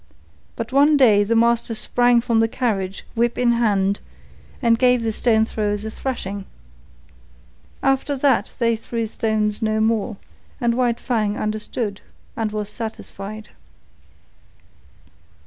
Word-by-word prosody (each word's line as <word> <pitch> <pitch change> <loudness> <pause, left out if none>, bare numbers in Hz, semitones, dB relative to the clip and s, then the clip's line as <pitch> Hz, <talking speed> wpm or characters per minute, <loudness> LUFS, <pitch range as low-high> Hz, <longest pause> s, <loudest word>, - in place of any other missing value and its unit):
But 230 +1 -5
one 290 +3 +5
day 215 -7 +5
the 225 +3 0
master 235 0 +2
sprang 245 +1 +3
from 230 -2 +1
the 225 - +3
carriage, 200 -6 -2
whip 235 +1 0
in 245 -1 +3
hand, 200 -4 +1 0.6
and 230 -3 +3
gave 250 -2 +3
the 225 - 0
stone 220 0 +2
throwers 210 -1 -2
a 220 - -4
thrashing. 205 -6 -4 1.4
After 270 +1 +1
that 275 0 +2
they 230 -1 +2
threw 230 +1 -4
stones 215 -1 -1
no 215 0 +1
more, 220 -1 0 0.4
and 235 -1 +1
White 240 -1 +1
Fang 215 -4 -1
understood 215 0 -3 0.3
and 220 -2 -2
was 210 -1 -3
satisfied. 215 -1 -7
225 Hz, 130 wpm, -21 LUFS, 215-240 Hz, 1.4 s, one